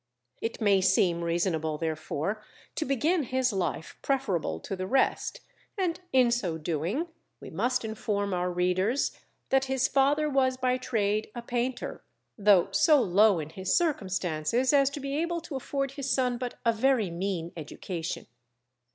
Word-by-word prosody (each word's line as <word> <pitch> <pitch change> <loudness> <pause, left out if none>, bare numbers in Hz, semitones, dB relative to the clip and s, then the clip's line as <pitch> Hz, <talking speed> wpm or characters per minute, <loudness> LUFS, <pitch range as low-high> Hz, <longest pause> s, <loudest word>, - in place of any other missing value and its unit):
It 225 - -3
may 200 -3 +4
seem 180 -2 +3
reasonable 165 -2 0
therefore, 160 +5 -3 0.3
to 310 - -2
begin 305 +7 +1
his 260 -2 0
life 175 -5 -3
preferable 250 - -1
to 195 - -4
the 185 0 -4
rest, 265 +6 +1 0.4
and 355 -3 0
in 255 -2 +4
so 190 -9 -1
doing 170 - -2 0.3
we - - -10
must 255 -1 0
inform 210 -2 -2
our 180 0 0
readers 180 +8 +1 0.3
that 270 0 +3
his 265 -1 +1
father 285 +3 +3
was 265 -3 +2
by 255 0 +1
trade 215 -4 0
a 240 - -5
painter, 245 +1 -3 0.3
though 200 -3 +4
so 300 - +5
low 205 -2 +4
in 155 -1 -5
his 190 +1 0
circumstances 195 - 0
as 275 -1 +5
to 280 - -6
be 275 0 -3
able 340 +1 -1
to 320 -3 -7
afford 275 +1 -2
his 275 -1 -4
son 250 -1 +1
but 250 -1 -4
a 230 - +4
very 225 -4 +2
mean 175 -1 -3
education. 165 +1 -5
225 Hz, 155 wpm, -28 LUFS, 180-265 Hz, 0.4 s, so